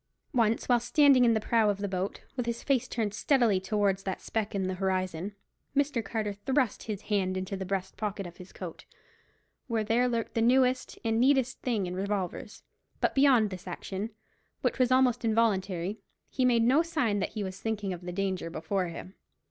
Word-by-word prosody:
Once, 230 -3 +2
while 245 -1 +4
standing 265 +2 +5
in 230 -1 +4
the - - +2
prow 220 0 +2
of 205 - 0
the 200 0 -3
boat, 190 0 -3
with 245 -2 -2
his 235 0 -3
face 270 -4 +1
turned 215 -4 -2
steadily 230 -3 +3
towards 195 0 0
that 190 -1 -4
speck 215 -2 -3
in 195 - 0
the 185 0 -1
horizon, 185 0 -2 0.4
Mr. 285 -5 +1
Carter 210 0 -2
thrust 255 +3 0
his 210 -2 -4
hand 190 -3 0
into 190 +2 -3
the 190 -1 -5
breast 190 -1 -3
pocket 205 -2 -3
of 175 -1 -10
his 180 +1 -12
coat, - - -8 0.8
where 230 -3 0
there 235 +4 +2
lurked 230 -2 -2
the 225 - +1
newest 255 +2 +2
and 225 0 +2
neatest 260 0 +2
thing 225 -6 0
in 180 - -4
revolvers; 195 -1 -3 0.4
but - - +1
beyond 260 -7 +4
this 185 0 -8
action, 190 +4 -4 0.5
which - - 0
was 255 -1 +3
almost 255 -2 +3
involuntary, 205 -4 +1 0.3
he 255 - +1
made 235 -2 +4
no 260 +7 +5
sign 275 -12 0
that 200 - -2
he 215 - -3
was 190 0 -6
thinking 210 -4 -2
of 175 - -8
the 180 0 -6
danger 190 -2 -2
before 175 +3 -2
him. 170 +2 -8
210 Hz, 195 wpm, -29 LUFS, 190-240 Hz, 0.8 s, standing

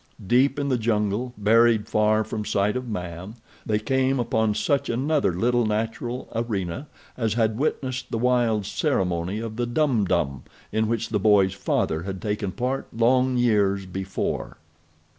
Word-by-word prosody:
Deep 130 +5 +3
in 140 -1 -1
the 125 -2 +1
jungle, 110 +1 0
buried 110 +1 +4
far 110 0 +2
from 110 0 -4
sight 105 +1 0
of 125 0 -3
man, 90 +1 -6 0.3
they 105 - +2
came 130 +4 +1
upon 110 -2 +1
such 140 +3 0
another 140 0 +1
little 120 +7 +1
natural 115 +3 -2
arena 115 - -3 0.3
as 115 -3 -1
had 110 -1 +1
witnessed 130 -3 -2
the - - -2
wild 120 -3 +2
ceremony 90 +1 -1
of 110 0 -5
the 120 -1 -1
Dum 120 -4 +1
Dum 75 -8 0 0.3
in 110 0 +1
which 115 0 -1
the 105 - 0
boy's 100 -2 +4
father 80 -4 -1
had 95 +1 -5
taken 105 -1 -2
part 130 +5 -2
long 125 +2 +2
years 100 -5 +2
before. 95 +1 -4
110 Hz, 155 wpm, -24 LUFS, 100-125 Hz, 0.3 s, buried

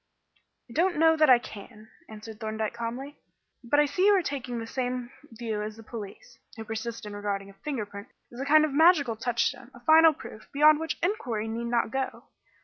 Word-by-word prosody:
"I 235 - -13
don't 350 +4 +1
know 320 +1 +5
that 310 -2 +4
I 250 - +8
can," 215 -1 -11 0.2
answered 215 0 -10
Thorndyke 220 0 -3
calmly; 240 +5 -6 0.4
"but 265 +5 +2
I 295 - +5
see 365 +7 +1
you 415 - +6
are 370 - 0
taking 255 -5 -4
the 225 - -4
same 250 0 -3 0.2
view 225 -2 -4
as 215 +1 -6
the 225 - -12
police, 225 - -10 0.2
who 225 - -6
persist 225 +1 -5
in 205 -1 -7
regarding 200 -1 -4
a 195 - -26
finger 270 -8 -3
print 200 0 -10 0.3
as 240 - -10
a 270 - -3
kind 310 +2 +5
of 300 - -4
magical 300 -6 +4
touchstone, 235 +2 -2
a - - -12
final 320 +4 +6
proof, 215 -6 -12
beyond 300 +1 +5
which 320 -1 -3
inquiry 245 - -1
need 230 +1 -4
not 235 -1 0
go. 265 +1 -3
240 Hz, 205 wpm, -27 LUFS, 220-295 Hz, 0.4 s, I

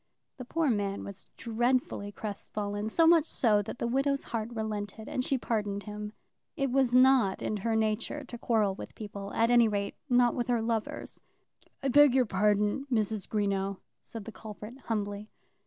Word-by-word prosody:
The 255 - -7
poor 315 +1 +1
man 200 -2 -1
was 200 -1 -9
dreadfully 235 -3 0
crestfallen, 205 0 -4
so 330 +8 +4
much 325 -2 +6
so 215 -9 +2
that 205 - -7
the - - -2
widow's 275 +3 +1
heart 225 -1 -1
relented, 220 -1 -4
and 255 - -1
she 270 - +1
pardoned 210 -4 -2
him. 210 0 -6 0.4
It 275 -3 0
was 260 -2 +3
not 255 -6 +5
in 215 - -1
her 225 +3 -1
nature 220 +6 -1
to 245 -2 -8
quarrel 215 -5 +2
with - - -9
people; 200 -2 -7
at 230 +1 +3
any 240 -1 +6
rate, 200 -1 -1 0.2
not 245 -1 +4
with 245 - -2
her 240 -2 +2
lovers. 225 -1 -3 0.6
"I 275 - +1
beg 285 0 +6
your 255 -2 +4
pardon, 210 +6 +1
Mrs. 215 -3 0
Greenow," 200 -2 0 0.2
said 225 -3 -8
the 225 - -7
culprit, 215 +2 -9
humbly. 205 -1 -3
220 Hz, 170 wpm, -30 LUFS, 205-245 Hz, 0.6 s, much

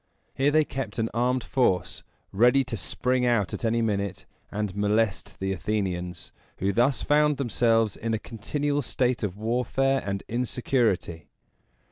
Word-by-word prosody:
Here 135 +2 +2
they 155 +1 +3
kept 130 -7 -5
an 115 -1 -1
armed 125 +1 +1
force, 110 -9 0 0.3
ready 125 +7 +4
to 130 -2 -4
spring 125 +7 -1
out 115 -7 +1
at - - -5
any 115 0 +1
minute 100 -3 -2 0.2
and 105 -2 -3
molest 105 0 0
the 95 0 -1
Athenians, 90 -2 -3 0.3
who 100 +1 0
thus 125 +6 +2
found 150 -1 +3
themselves 115 -4 +2
in 115 0 -1
a - - 0
continual 145 +7 -2
state 125 -2 0
of 100 -2 -3
warfare 125 +4 +1
and 100 -1 -3
insecurity. 120 - -1
115 Hz, 145 wpm, -26 LUFS, 100-125 Hz, 0.3 s, ready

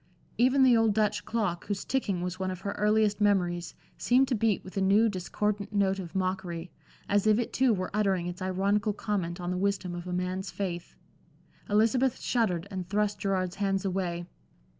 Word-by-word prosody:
Even 260 +2 +5
the 255 -2 +6
old 225 -2 +3
Dutch 210 -1 +1
clock, 205 -7 -2
whose 200 -2 -3
ticking 205 -9 -1
was 180 +1 -4
one 190 0 -1
of 185 -1 -5
her 200 - -3
earliest 210 0 +2
memories, 180 -4 +1 0.2
seemed 260 +2 +3
to - - +1
beat 220 -3 +1
with 185 - -11
a 195 - 0
new, 200 +4 +4
discordant 205 +1 -2
note 195 -1 +2
of 180 -1 -8
mockery, 185 -2 -2 0.4
as 205 +1 +2
if 215 -1 +5
it 240 - -2
too 260 -1 +3
were 185 -3 -1
uttering 195 -4 +1
its 175 +1 -6
ironical 200 +3 +1
comment 185 -5 -3
on 175 0 -3
the 180 - -1
wisdom 195 -2 -1
of 175 0 -6
a - - -4
man's 185 +2 -2
faith. 175 -3 -5 0.7
Elizabeth 230 +5 +2
shuddered 200 -8 0
and 185 -2 -5
thrust 205 0 0
Gerard's 185 -1 -1
hands 195 -1 0
away. 180 -2 -2
195 Hz, 185 wpm, -29 LUFS, 180-210 Hz, 0.7 s, the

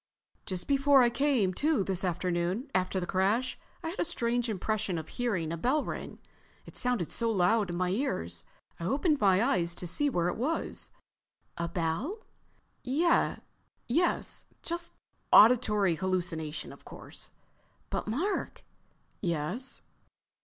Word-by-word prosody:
"Just 185 -3 -3
before 275 -1 +5
I 240 - +3
came 240 -7 +2
to 295 - +2
this 190 -1 -1
afternoon, 180 - -1
after 185 +1 +1
the 180 - -2
crash, 200 +8 +1 0.2
I 325 - -2
had 350 - -7
a - - +3
strange 240 -5 0
impression 210 -2 -1
of 160 -1 -6
hearing 200 -10 -1
a - - -3
bell 265 - +1
ring. - - -6 0.5
It - - -13
sounded 245 -9 0
so 230 -1 -1
loud 210 0 +3
in 175 - -3
my 180 0 +1
ears 85 - -1 0.4
I 170 - -4
opened 295 - +2
my 195 0 +5
eyes 175 -10 +1
to 180 - -4
see 290 - +1
where 175 -9 +1
it 180 - -2
was." 295 +8 -2 0.7
"A—bell?" 170 - -2 0.6
"Yes. 325 +1 0 0.2
Just 340 0 -3 0.4
auditory 210 -5 +6
hallucination, 170 -4 -2
of - - -16
course." - - -9 0.6
"But - - -2
Mark—" 325 - -2 0.6
"Yes?" 170 - -3
210 Hz, 135 wpm, -30 LUFS, 175-265 Hz, 0.7 s, auditory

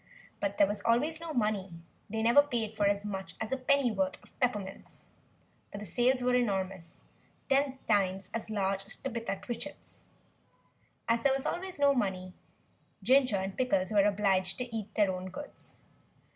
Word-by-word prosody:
But 200 0 -2
there 200 - +6
was 205 +1 -3
always 285 +8 +2
no 335 -1 -6
money; 210 - -1 0.3
they 220 +1 -2
never 235 +5 +7
paid 235 -6 -3
for 205 -2 +2
as 200 0 0
much 195 -2 -5
as 220 - -4
a - - +2
pennyworth 245 -8 +1
of - - -22
peppermints. 210 -7 -3 0.7
But 205 - -6
the 210 - -7
sales 245 +6 +2
were 250 0 +2
enormous, 190 -7 -1 0.5
ten 275 -1 +2
times 195 -2 +1
as 230 -1 -3
large 195 -2 0
as 220 - -2
Tabitha 235 -6 -3
Twitchit's. 240 +7 -7 1.0
As 230 0 +2
there 270 +2 +3
was 270 0 -2
always 370 +1 -3
no 285 -1 +5
money, 185 -7 -2 0.7
Ginger 255 0 +4
and 190 0 -2
Pickles 195 -6 +1
were 205 -2 +4
obliged 195 -2 +2
to 245 -2 -5
eat 215 -2 -4
their 205 -3 +3
own 185 0 -5
goods. 290 +10 -10
215 Hz, 165 wpm, -31 LUFS, 195-250 Hz, 1.0 s, never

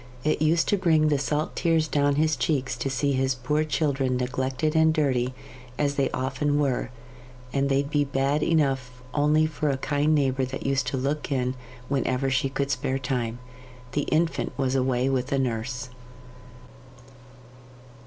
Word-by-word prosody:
It 155 0 +1
used 155 +1 +3
to 205 - +3
bring 160 -4 +3
the 145 -2 +2
salt 150 +3 -1
tears 165 -2 +2
down 145 -1 +2
his 155 +1 +2
cheeks 130 0 -1
to 120 +3 -3
see 140 +2 0
his 130 -1 +1
poor 150 +5 0
children 140 -4 0
neglected 130 +4 -1
and 160 0 +5
dirty, 130 -5 0 0.4
as 145 -1 +1
they 140 -2 +1
often 135 +3 -1
were, 135 -4 0 0.6
and 140 0 +1
they'd 140 +1 +1
be 145 -1 +3
bad 140 +1 0
enough 135 -6 0
only 150 +1 +3
for 155 -1 -1
a 135 - 0
kind 145 +3 +1
neighbour 135 -2 +1
that 130 +1 -5
used 135 -1 +1
to 130 - -1
look 140 +4 -2
in 125 -2 0 0.3
whenever 135 -1 0
she 135 +1 +1
could 140 +1 -2
spare 130 +1 -1
time. 125 -3 -2 0.5
The 145 +1 -1
infant 165 +1 0
was 135 -2 0
away 130 -1 +1
with 130 -1 -1
a 140 - +2
nurse. 125 0 -2
135 Hz, 165 wpm, -26 LUFS, 130-150 Hz, 0.6 s, and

